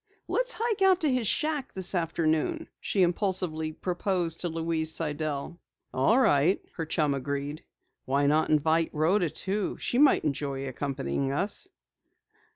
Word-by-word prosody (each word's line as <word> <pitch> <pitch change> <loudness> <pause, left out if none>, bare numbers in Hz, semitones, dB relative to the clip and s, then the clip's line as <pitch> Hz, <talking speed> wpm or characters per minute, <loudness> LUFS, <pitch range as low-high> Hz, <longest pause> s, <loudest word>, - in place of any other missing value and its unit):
"Let's - - +2
hike 450 -2 -1
out 380 -1 +5
to 305 -4 +3
his 245 -4 0
shack 300 0 -1
this 190 0 -2
afternoon," 165 - 0
she 195 - +1
impulsively 175 -3 0
proposed 175 0 -1
to 175 - -2
Louise 160 -1 -2
Sidell. 150 0 -2 0.3
"All 135 - +3
right," 170 - +3
her 165 -4 -4
chum 150 -2 +1
agreed. 140 +3 -4 0.4
"Why 140 +2 +1
not 155 +2 +2
invite 160 +2 +2
Rhoda 170 +4 +2
too? 195 +5 -2
She 245 - -1
might 290 0 +5
enjoy 140 -2 -2
accompanying 135 0 -2
us." 195 - -2
165 Hz, 140 wpm, -28 LUFS, 150-200 Hz, 0.4 s, out